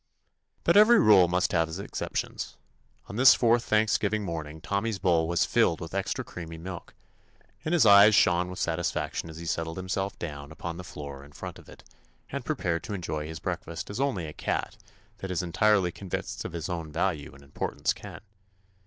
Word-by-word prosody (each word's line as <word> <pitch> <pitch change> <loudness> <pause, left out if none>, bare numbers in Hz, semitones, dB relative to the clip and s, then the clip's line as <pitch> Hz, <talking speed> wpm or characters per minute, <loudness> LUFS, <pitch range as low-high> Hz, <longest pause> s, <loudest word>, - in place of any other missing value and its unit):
But - - +3
every 215 +3 +8
rule 105 - +6
must 90 +3 +1
have 80 -2 +1
its 80 - -5
excep 100 - -6
tion. - - -2 0.7
On 100 - -7
this 130 0 +8
fourth 120 0 +3
Thanksgiving 110 -1 +1
morning 80 -3 -5
Tommy's 100 +5 -2
bowl 85 -4 +2
was 85 0 +2
filled 115 -9 +2
with 85 - -8
extra 95 0 -2
creamy 85 -2 -8
milk, 90 +1 -8 0.7
and 160 - -2
his 175 -8 +4
eyes 100 +1 +8
shone 90 0 +3
with 90 - -7
satisfaction 85 -1 -2
as 80 - -9
he 85 - -7
settled 80 0 -2
himself 95 +1 -3
down 70 -3 -7
upon 85 +1 -6
the 90 - -7
floor 70 -5 -8
in 70 +1 -16
front - - -8
of - - -16
it - - -14 0.5
and 140 -1 -4
prepared 90 - -1
to 105 - -4
en 90 - -6
joy 75 -1 -3
his 80 0 -6
breakfast 90 -1 -5
as 105 - -5
only 135 - 0
a 75 - -7
cat - - -2 0.4
that 95 - -5
is 90 -1 -1
entirely 95 +1 +2
convinced 95 +1 -5
of - - -5
his 80 -2 -4
own 85 -3 -4
value 80 -5 -2
and 70 - -16
importance 70 - -2
can. - - -10
90 Hz, 195 wpm, -28 LUFS, 80-100 Hz, 0.7 s, every